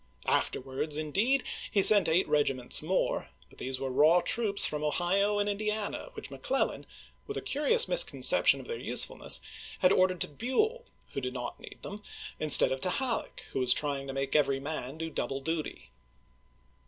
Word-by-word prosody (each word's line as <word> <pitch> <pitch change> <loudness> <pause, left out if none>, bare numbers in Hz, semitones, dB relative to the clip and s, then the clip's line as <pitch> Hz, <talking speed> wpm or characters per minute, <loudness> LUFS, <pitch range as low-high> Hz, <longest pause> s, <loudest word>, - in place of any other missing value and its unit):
Afterwards, 135 +3 -1
indeed, 205 - 0 0.3
he 200 - +1
sent 200 -6 +7
eight 170 +4 +1
regiments 135 -4 0
more; 180 +5 -2 0.2
but - - -18
these 130 0 -4
were 135 -1 -4
raw 155 +6 +4
troops 205 +1 +4
from 150 0 -2
Ohio 195 +7 0
and 205 0 -1
Indiana 210 - -4
which - - -9
McClellan, - - -3 0.4
with - - -6
curious 380 - +2
misconception - - +4
of - - -11
their 470 - -6
usefulness, - - +1 0.4
had 185 -1 +2
ordered 185 -1 +1
to - - 0
Buell, 430 - -2 0.3
who 135 - -4
did 125 0 -5
not 120 -1 -6
need - - -14
them, 205 +1 -8 0.4
instead 155 -1 +7
of 130 0 -4
to 185 - -1
Halleck, 250 +3 -4
who - - -2
was 125 -1 +3
trying 140 -2 -2
to 135 - -6
make 135 +1 -3
every 140 -2 +1
man 140 -1 -6
do 160 0 -6
double 135 -2 -4
duty. 160 +2 -6
165 Hz, 165 wpm, -28 LUFS, 135-210 Hz, 0.4 s, sent